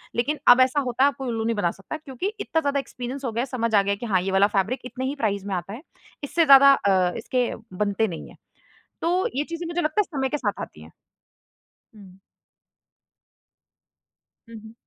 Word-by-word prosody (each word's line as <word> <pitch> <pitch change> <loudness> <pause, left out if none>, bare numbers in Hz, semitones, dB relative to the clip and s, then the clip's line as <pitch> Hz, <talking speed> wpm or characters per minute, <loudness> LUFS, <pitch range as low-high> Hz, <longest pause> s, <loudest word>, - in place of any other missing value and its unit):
लेकिन 275 +5 -1
अब 245 +1 +8
ऐसा 260 +3 +3
होता, 255 +1 +2
अब 285 - -1
कोई 270 - -5
उल्लू 225 -2 -2
नहीं 230 0 0
बना 175 -5 0
सकता 195 +10 -8
क्योंकि 290 +2 -5
इतना 320 - -1
ज़्यादा 285 -2 0
एक्सपीरियंस 265 0 -6
हो 240 - -2
गया 230 +2 -1
है, - - -1
समझ 235 -4 -3
आ 200 - +6
गया 200 +1 -1
कि 215 - -7
हाँ 190 -5 +1
ये 195 - -3
वाला 195 +1 +4
फैब्रिक 210 +7 0
इतने 255 +1 -5
ही 275 +2 -2
प्राइस 205 -7 -1
में 200 -2 -2
आता 180 +2 -5
है। 235 - -8 0.4
इससे 330 +3 +1
ज़्यादा 275 -1 +8
अ, 190 -7 +2
इसके 250 -2 -1 0.3
बनते 205 +2 0
नहीं 170 -5 -7
हैं। - - -17 0.6
तो 355 +3 +1
ये 285 - 0
चीज़ें 335 +1 -6
मुझे 340 +1 -2
लगता 310 +6 +1
है - - 0
समय 265 0 0
के 295 - -1
साथ 210 -7 -3
आती 75 - -9
है। 80 - -14 1.1
हुँ। 190 -3 -15 2.3
हुँ, 230 - -11
हुँ। 220 0 -12
245 Hz, 210 wpm, -24 LUFS, 200-280 Hz, 2.3 s, अब